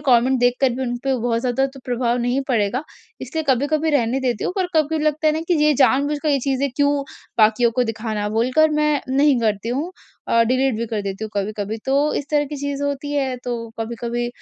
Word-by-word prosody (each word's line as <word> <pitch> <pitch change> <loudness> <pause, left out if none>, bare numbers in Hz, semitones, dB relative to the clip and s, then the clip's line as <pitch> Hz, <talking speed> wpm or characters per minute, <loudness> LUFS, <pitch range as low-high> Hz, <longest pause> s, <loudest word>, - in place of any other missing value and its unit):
Comment 255 +1 +4
देख 245 0 +3
कर 265 -2 +4
भी 265 - -3
उन 245 -1 -2
पे 270 -1 +1
बहुत 230 -1 0
ज़्यादा 255 +2 +1
तो 270 0 -12
प्रभाव 245 -1 0
नहीं 245 +3 0
पड़ेगा। 235 +2 +1 0.4
इसलिए 320 -1 -3
कभी-कभी 295 +5 +2
रहने 260 -2 +1
देती 245 -5 -1
हूँ। - - -1
पर 370 -2 +1
कभी 310 +1 +2
लगता 305 +1 +1
है 305 - +5
ना 315 - -1
कि 350 - +4
ये 300 - +5
जानबूझकर 285 +3 +2
ये 280 - +3
चीज़ें 275 +1 0
क्यों 285 0 +3 0.4
बाकियों 220 +2 +4
को 250 +1 +1
दिखाना 220 -2 -3
बोलकर 255 +8 +2
मैं 300 -1 +1
नहीं 275 0 +3
करती 215 0 -1
हूँ। 295 +9 -2 0.4
और 230 0 +4
डिलीट 255 +1 +1
भी 230 +1 -2
कर 215 -2 -3
देती 195 +2 -4
हूँ 215 - -7
कभी-कभी। 210 +2 -3
तो 285 +3 +2
इस 285 - -3
तरह 295 -1 +2
की 295 +1 -6
चीज़ 285 0 -3
होती 285 +1 -3
है। 265 -3 0
तो 235 -2 -4
कभी-कभी 235 +1 -3
260 Hz, 215 wpm, -21 LUFS, 230-285 Hz, 0.4 s, है